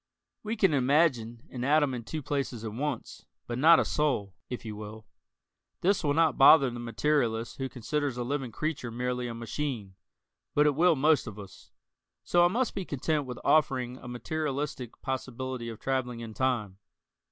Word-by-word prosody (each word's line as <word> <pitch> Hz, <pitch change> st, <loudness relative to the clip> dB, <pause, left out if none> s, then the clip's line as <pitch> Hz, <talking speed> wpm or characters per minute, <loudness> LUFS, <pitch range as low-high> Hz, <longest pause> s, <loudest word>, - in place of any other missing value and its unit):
We 220 Hz, +1 st, -3 dB
can 195 Hz, -7 st, +3 dB
imagine 130 Hz, -4 st, +2 dB
an 125 Hz, -2 st, -5 dB
atom 145 Hz, 0 st, +3 dB
in 120 Hz, -2 st, -4 dB
two 155 Hz, +6 st, -5 dB
places 135 Hz, -5 st, -3 dB
at 110 Hz, -2 st, -5 dB
once, 145 Hz, +6 st, -4 dB, 0.2 s
but 120 Hz, +1 st, -4 dB
not 165 Hz, +4 st, +7 dB
a -, -, +1 dB
soul, 130 Hz, -11 st, 0 dB, 0.2 s
if 125 Hz, -2 st, -6 dB
you 110 Hz, -1 st, -5 dB
will. 110 Hz, +1 st, -9 dB, 0.8 s
This 195 Hz, +1 st, +2 dB
will 145 Hz, -1 st, +1 dB
not 160 Hz, -2 st, +3 dB
bother 135 Hz, -1 st, +8 dB
the 120 Hz, -, -6 dB
materialist 120 Hz, -1 st, 0 dB
who 135 Hz, -1 st, -3 dB
considers 135 Hz, +2 st, -2 dB
a 120 Hz, -, -1 dB
living 135 Hz, -1 st, -3 dB
creature 155 Hz, -3 st, -3 dB
merely 125 Hz, +1 st, -2 dB
a 115 Hz, -, -5 dB
machine, 115 Hz, -3 st, -4 dB, 0.6 s
but 150 Hz, -, +5 dB
it 150 Hz, -, +4 dB
will 170 Hz, +3 st, +4 dB
most 150 Hz, -1 st, +3 dB
of 105 Hz, -2 st, -7 dB
us. 100 Hz, -3 st, -12 dB, 0.5 s
So 175 Hz, 0 st, +4 dB
I -, -, +7 dB
must 235 Hz, +7 st, 0 dB
be 195 Hz, -, -3 dB
content 150 Hz, -1 st, -1 dB
with 125 Hz, -, -6 dB
offering 130 Hz, -5 st, +2 dB
a 130 Hz, -, -11 dB
materialistic 135 Hz, 0 st, -4 dB
possibility 130 Hz, -2 st, -4 dB
of 115 Hz, -, -8 dB
traveling 125 Hz, -3 st, -2 dB
in 115 Hz, -1 st, -7 dB
time. 110 Hz, -7 st, -1 dB
130 Hz, 175 wpm, -29 LUFS, 120-150 Hz, 0.8 s, bother